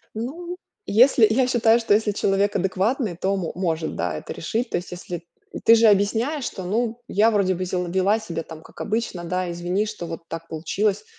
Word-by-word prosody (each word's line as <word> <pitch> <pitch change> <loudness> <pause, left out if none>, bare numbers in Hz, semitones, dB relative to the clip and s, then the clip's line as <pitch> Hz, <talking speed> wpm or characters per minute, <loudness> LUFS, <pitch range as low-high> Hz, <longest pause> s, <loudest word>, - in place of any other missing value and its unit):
Ну, 335 +11 -5 0.3
если 235 +1 +5
я 250 +3 +2
считаю, 230 -2 +4
что 225 -3 +2
если 210 0 +2
человек 200 0 +1
адекватный, 195 +3 0
то 190 +3 0
мо 180 -4 -3
может, 165 -3 -2
да, 85 -3 -2
это - - -7
решить. 230 +9 -2
То - - 0
есть, 175 - -7
если 175 -1 -6 0.4
ты 230 - +8
же 230 0 +5
объясняешь, 225 +8 +2
что, 190 - -5
ну, 230 +4 -1
я 220 +3 +3
вроде 195 -3 +2
бы 185 +1 -3
сде 180 0 -2
вела 190 +5 +2
себя 165 -6 -5
там 160 -1 -11
как - - -12
обычно, 215 -5 -2
да, 180 +1 -2
извини, 175 +4 -1
что 210 -5 -6
вот 165 0 -6
так 165 0 -7
получилось. 190 +6 -1
200 Hz, 200 wpm, -23 LUFS, 175-225 Hz, 0.4 s, ты